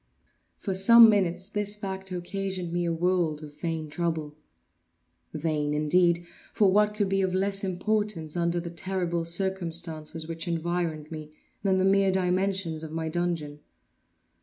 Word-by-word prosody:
For 195 - -3
some 225 +4 +8
minutes 185 -2 0
this 210 0 -1
fact 190 -2 -6
occasioned 185 -1 -4
me 175 0 0
a 170 - 0
world 165 -2 0
of 145 -1 -10
vain 165 -2 -2
trouble; 160 -1 -3 1.0
vain 150 -1 -1
indeed! 170 +3 +2 0.3
for 200 -3 +4
what 210 +1 +3
could 205 -2 +1
be 195 0 +1
of 185 -1 0
less 195 +1 0
importance, 190 -3 -1
under 170 0 +1
the 170 0 -6
terrible 175 -2 -2
circumstances 170 -3 -2
which 165 +1 -5
environed 165 -2 -2
me, 155 -1 -7 0.3
then 190 -1 +2
the 185 - +2
mere 195 0 +4
dimensions 185 -3 0
of 155 - -7
my 160 0 -3
dungeon? 160 -3 -2
175 Hz, 145 wpm, -27 LUFS, 165-190 Hz, 1.0 s, some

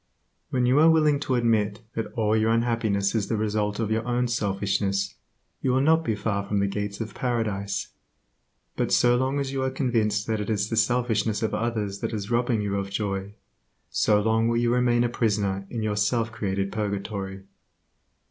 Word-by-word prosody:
When 125 -1 +1
you 130 +4 +4
are 160 +2 +7
willing 155 -3 +4
to 135 -3 -1
admit 110 -3 +1
that 115 - -4
all 110 -3 +1
your 110 0 +2
unhappiness 115 -4 +1
is 110 -3 0
the 110 - -1
result 105 -1 -1
of 110 -2 -1
your 110 +1 +1
own 125 0 +1
selfishness 100 -3 -1 0.5
you 130 - +1
will 130 +1 +3
not 160 +3 +4
be 110 -9 0
far 100 -1 -1
from 100 +1 -2
the 100 - +2
gates 100 +1 -3
of 110 -2 -5
Paradise; 110 -5 -2 0.9
but - - -1
so 120 0 +4
long 130 +3 0
as 135 -1 -2
you 135 -1 -2
are 130 - +1
convinced 115 -6 0
that 110 -2 -1
it 105 - -4
is 105 0 -1
the - - +1
selfishness 115 -2 +1
of 110 - -1
others 110 -4 -2
that - - -3
is 105 +1 -4
robbing 120 -2 +1
you 100 -1 -1
of 100 0 -3
joy, 100 0 -3 0.6
so 105 -1 +3
long 110 +2 +2
will 115 0 +1
you 120 0 +2
remain 120 -1 +3
a - - +2
prisoner 100 -4 -1
in 115 -3 -3
your 105 -1 0
self 110 +2 +1
created 100 -2 -2
purgatory. 100 -2 -4
110 Hz, 195 wpm, -25 LUFS, 100-120 Hz, 0.9 s, are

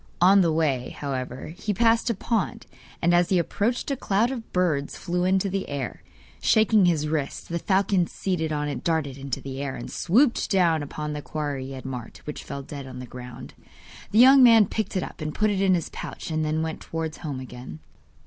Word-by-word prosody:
On 190 +3 +6
the 170 -3 +3
way, 145 -6 0
however, 130 -2 -4
he 205 +2 -3
passed 230 +2 +3
a 230 - 0
pond, 220 +1 -2 0.4
and 175 +1 +4
as 175 0 +4
he 185 - +3
approached 220 - -1
a - - +1
cloud 225 0 +1
of 240 -4 -7
birds 160 -6 0
flew 180 0 -1
into 190 +1 +2
the 195 0 -3
air. 140 -3 -4 0.4
Shaking 215 -3 +4
his 155 -3 +1
wrist, 150 -3 -3
the 170 0 -2
falcon 190 -1 +2
seated 165 -5 -2
on 150 -1 -1
it 140 -4 -4
darted 160 -5 0
into 135 -1 -4
the 135 0 -6
air, 140 -2 -3
and - - -7
swooped 235 +8 +2
down 170 -5 +3
upon 150 +1 -5
the 150 - -4
quarry 145 -3 -4
he - - -8
had 130 -1 -8
marked, 125 -3 -7
which 150 - -6
fell 140 0 -6
dead 140 0 -8
to 130 - -9
the 125 0 -7
ground. 125 0 -10 0.6
The 215 - 0
young 265 +3 +8
man 230 -4 +8
picked 215 0 -3
it 185 - 0
up, - - -9
and 155 0 -4
put 215 0 +2
it 195 -1 0
in 190 -2 +4
his 170 - -2
pouch - - -7
and 155 0 0
then 155 +1 0
went 160 -1 -4
towards 160 -2 -4
home 145 -5 -5
again. 125 -10 -9
160 Hz, 215 wpm, -25 LUFS, 140-195 Hz, 0.6 s, young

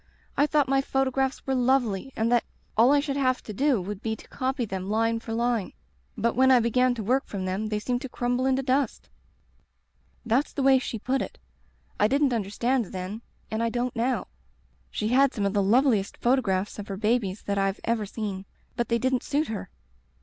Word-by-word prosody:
I 290 - +3
thought 295 -2 +2
my 270 0 +3
photo 270 -1 0
graphs 265 0 -1
were 270 - 0
lovely 250 -3 +1
and 225 +2 0
that 240 -1 +4 0.3
all 235 +5 +6
I 290 - +5
should 280 -1 -2
have 255 -2 +1
to 215 - -7
do 270 +2 +2
would 195 +2 -5
be 220 -1 -2
to - - -15
copy 260 -1 -2
them 190 -2 -5
line 225 +1 +1
for 225 - -8
line. 235 -3 0 0.4
But 235 +1 0
when 260 +2 +5
I 255 -2 +7
began 245 +2 +2
to 225 - -4
work 255 +6 +1
from 190 -2 -4
them 190 +4 -2
they 215 -1 -1
seemed 245 +3 -2
to 265 - -6
crumble 245 +2 0
into 265 0 +1
dust* 265 -1 0 1.2
"That's 245 +5 +1
the 280 - -1
way 265 -1 +6
she 245 - -4
put 260 +5 -1
it. - - -6 0.6
I 210 - +5
didn't 275 +1 +2
un 225 -3 0
derstand 235 +2 0
then, 190 +4 -5 0.3
and 220 +1 -1
I 230 - +1
don't 245 +1 -2
now. 240 +1 0 0.6
She 215 - -2
had 270 +2 +4
some 205 -4 -1
of 200 - 0
the 205 - +2
loveliest 220 0 +2
photographs 210 -6 +1
of 205 - -6
her 195 - -5
babies 210 -2 0
that 200 -1 -1
I've 195 0 0
ever 225 -3 0
seen. 200 -2 -5 0.3
But 240 - -1
they 235 - +3
didn't 255 +1 +1
suit 295 +2 -1
her. 205 -4 -5
235 Hz, 210 wpm, -26 LUFS, 210-265 Hz, 1.2 s, I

